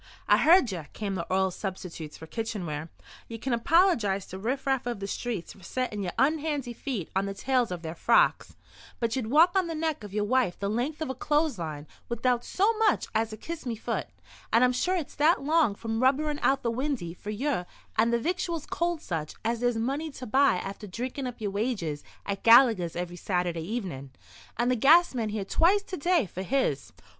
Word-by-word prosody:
"I - - +6
heard 320 - +5
ye," 180 -3 -4
came 205 -2 -3
the 170 -3 -3
oral 190 0 +2
substitutes 180 -5 -6
for 160 - -10
kitchenware. 170 -6 -4 0.4
"Ye 230 - -6
can 255 +3 -2
apollygise 235 - +3
to 190 - -7
riff 255 +7 -2
raff 265 -3 0
of 240 -4 -3
the 200 - -4
streets 205 -2 -4
for 195 - -18
settin' 215 +2 -3
yer 180 -2 -2
unhandy 285 -2 0
feet 230 - -4
on 195 +1 +1
the 195 - -4
tails 255 +2 +1
of 175 -2 -5
their 160 0 -4
frocks, - - +2 0.4
but 230 0 0
ye'd 255 -4 -2
walk 325 - +5
on 375 -2 +2
the 330 - -4
neck 315 -6 -2
of 205 - -8
yer 210 +1 0
wife 245 -4 +1
the 200 0 -2
length 280 +8 -2
of 260 - -3
a - - -3
clothes 295 - 0
line 155 -3 -5 0.2
without 240 +1 +1
so 410 +4 +2
much 435 -3 +2
as 220 0 0
a 215 - -7
'Kiss 335 +8 -6
me 235 - -1
fut,' 215 - -3 0.4
and 230 +2 +5
I'm 250 0 +4
sure 360 +9 +1
it's 330 -6 -3
that 305 +1 +3
long 300 -8 +3
from 225 +2 -3
rubberin' 290 +3 +2
out 270 0 +2
the 235 - +1
windy 250 - -2
for 205 - -9
ye 235 -1 -1 0.3
and 230 +2 +3
the 235 - +3
victuals 335 +3 -2
cold 340 -2 -1
such 155 -3 -4
as 230 +1 0
there's 245 -1 +1
money 275 +8 -2
to 255 - -8
buy 270 0 +4
after 195 +3 -6
drinkin' 250 +7 -4
up 245 - -7
yer 205 -3 -2
wages 200 - -2 0.2
at 200 -1 -3
Gallegher's 230 -8 +6
every 175 0 -4
Saturday 175 -2 -1
evenin', 175 - -4 0.5
and 240 +2 +2
the - - +3
gas 315 +9 +6
man 230 -4 -1
here 210 -2 -3
twice 380 - +3
to 375 - -6
day 340 - +2
for 185 0 -7
his." 190 - -1
235 Hz, 210 wpm, -28 LUFS, 195-285 Hz, 0.5 s, I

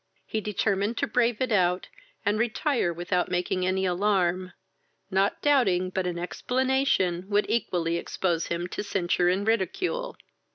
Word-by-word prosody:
He 220 - -2
determined 205 +1 0
to - - +1
brave 235 0 +1
it 255 - 0
out, 180 -3 +2 0.4
and 205 +2 +1
retire 235 - +1
without 175 +1 -1
making 180 0 0
any 190 +1 +1
alarm, 185 -1 +1 0.6
not 195 +1 +1
doubting 190 -11 +3
but 185 -1 -1
an 175 -1 -3
explanation 205 -3 0
would 205 0 +2
equally 170 -7 0
expose 170 -1 -1
him 170 +1 -2
to - - -4
censure 175 -3 +1
and 190 +3 0
ridicule. 230 - -1
190 Hz, 140 wpm, -27 LUFS, 180-220 Hz, 0.6 s, doubting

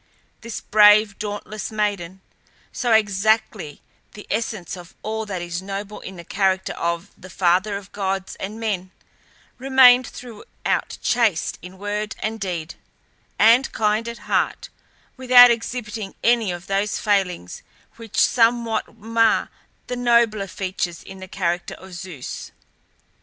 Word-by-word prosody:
This 230 -1 -6
brave, 210 -1 +5
dauntless 210 +1 -5
maiden, 200 -4 -2 0.5
so 245 -3 -1
exactly 210 -6 +1 0.3
the 210 - -11
essence 215 -5 -3
of 175 -1 -13
all 220 0 -3
that 185 -4 -4
is 175 0 -4
noble 200 +2 -6
in 190 - -9
the 170 - -10
character 190 +1 0
of 170 +3 -3
"the 185 - -13
father 185 +3 +1
of 200 0 -12
gods 195 -1 -3
and 210 +3 -6
men," 195 -5 -2 0.7
remained 255 -2 +6
throughout 235 -4 -4
chaste 225 -9 +1
in 180 +2 -11
word 210 +2 -3
and 220 +1 -4
deed, 175 -5 -4 0.6
and 235 +5 +5
kind 215 +1 +1
at 235 0 -5
heart, - - 0 0.5
without 250 -1 +8
exhibiting 225 -3 -4
any 230 -4 +3
of 175 0 -7
those 195 +1 -1
failings 190 - -1 0.4
which 230 -2 -9
somewhat 230 -2 +2
mar 225 +1 +1 0.3
the 250 - -4
nobler 235 -4 +2
features 185 -2 -4
in 190 - -11
the 190 - -9
character 175 -2 -2
of 190 0 -13
Zeus. 175 -6 -7
210 Hz, 130 wpm, -22 LUFS, 190-225 Hz, 0.7 s, without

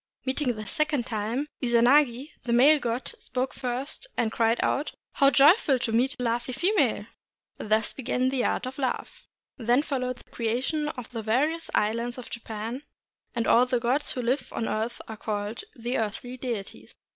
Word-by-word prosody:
Meeting 260 -2 0
the 215 0 -6
second 300 -1 0
time, 225 +5 -2 0.2
Izanagi, 250 +3 +4
the 240 - -3
male 285 +6 +6
god, 240 0 -2
spoke 255 +1 -3
first, 260 - -4
and 225 -2 +1
cried 230 +1 +2
out, 290 - 0
— - - -67
"How 275 -1 +6
joyful 285 - +5
to 235 -2 -2
meet 250 +5 +2
a - - -2
lovely 240 +1 -1
female!" 375 +9 +2 0.5
Thus 215 +1 +1
began 255 0 0
the 260 -2 0
art - - 0
of 260 +2 -6
love. 260 -2 -3 0.4
Then 245 +4 +3
followed 255 -4 -2
the - - -20
creation 255 +7 -1
of 250 -5 -7
the 230 -2 -4
various 290 +10 0
islands 230 +3 0
of 250 - -9
Japan, 225 +2 -5 0.5
and 230 -1 0
all 245 +2 +5
the 250 -1 +1
gods 255 +5 0
who 250 - -3
live 255 +2 -1
on - - -3
the - - -1
earth 225 +2 -2
and - - -18
are 220 - -7
called 210 - -3
the 240 +2 -2
earthly 225 +3 -3
deities. 235 -6 -6
245 Hz, 180 wpm, -27 LUFS, 230-270 Hz, 0.5 s, male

